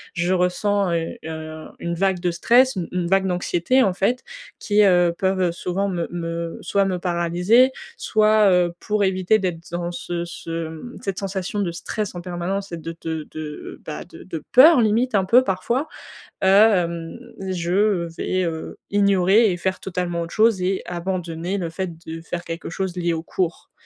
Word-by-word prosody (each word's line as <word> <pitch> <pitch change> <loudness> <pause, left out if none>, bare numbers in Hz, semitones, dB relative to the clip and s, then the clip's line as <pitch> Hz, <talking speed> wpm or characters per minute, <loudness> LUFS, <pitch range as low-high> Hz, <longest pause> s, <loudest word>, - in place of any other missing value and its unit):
je 175 +1 +1
ressens, 185 +2 +1
heu 165 -1 -2
heu, 155 0 -7
une 170 - -3
vague 190 +1 +1
de 175 0 0
stress, 245 +9 +4
u 175 - -2
une 180 -1 -1
vague 190 +2 +2
d'anxiété 180 +7 +1
en 195 -5 +2
fait 215 +7 0 0.3
qui, 210 0 +2
heu, 175 -3 +4
peuvent, 190 +1 0
heu, 180 -2 +2
souvent 180 +3 -2
me 175 -3 -2
me 170 -1 -4
soit 200 -1 +1
me 185 -2 -1
paralyser 180 +8 +3 0.3
soit, 215 -1 +4
heu, 180 -2 +3
pour 210 -1 0
éviter 190 +2 +2
d'être 175 -4 -4
dans 175 0 -3
ce 175 0 -4
ce, 170 -1 -9 0.2
mmh, 160 +10 -9
cette 195 -2 -3
sensation 195 0 -3
de 190 -4 0
stress 200 +3 -4
en 175 - -5
permanence 185 +2 -4
et 170 - -4
de 165 +1 -7
de 160 -2 -4
de 155 -1 -7
bah, 155 - -5
de - - -13
de 165 -5 -6
peur 270 +1 +8
limite 225 +3 +2
un 195 -2 +3
peu 245 +6 +5
parfois, 235 +9 -1 0.5
hem, 185 -5 +3 0.3
je 185 +1 +1
vais, 185 +2 -1
heu, 165 -2 -4
ignorer 200 +1 +4
et 175 - -2
faire 190 +2 -2
totalement 175 -2 -3
autre 170 0 -6
chose 220 -3 +4
et 185 +1 0
abandonner 175 0 -3
le 170 -4 -3
fait 185 +2 -3 0.2
de 165 0 -6
faire 170 +1 -5
quelque 165 0 -6
chose 185 +1 -3
lié 175 -1 0
au 160 0 -3
cours. 175 0 -3
180 Hz, 180 wpm, -22 LUFS, 170-200 Hz, 0.5 s, peur